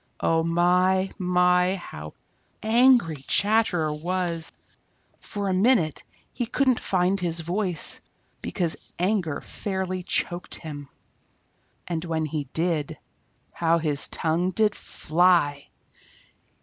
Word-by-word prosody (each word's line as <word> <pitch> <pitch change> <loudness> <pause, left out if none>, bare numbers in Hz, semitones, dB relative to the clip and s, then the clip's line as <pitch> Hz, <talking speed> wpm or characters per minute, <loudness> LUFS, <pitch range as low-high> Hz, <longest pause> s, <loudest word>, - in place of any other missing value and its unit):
Oh 165 0 +2
my, 180 +3 +2
my, 180 0 +3
how 75 - -9 0.5
angry 230 - +4
Chatterer 180 0 +2
was! 170 +1 -2 0.7
For 205 -2 -5
a 190 - +1
minute 190 - +2 0.3
he 240 - -3
couldn't 255 0 +2
find 185 +1 +1
his 170 -2 -1
voice, 180 0 0 0.4
because 175 -4 -2
his - - -15 0.2
anger 180 -5 0
fairly 190 -2 -3
choked 175 0 -2
him. 145 -3 -8 1.0
And 170 -2 -3
when 160 -2 -1
he 150 -1 -3
did, 160 +1 -2 0.5
how 165 0 +2
his 150 -3 0
tongue 170 +3 0
did 210 +2 +2
fly! 160 -6 +1
180 Hz, 110 wpm, -25 LUFS, 160-190 Hz, 1.0 s, angry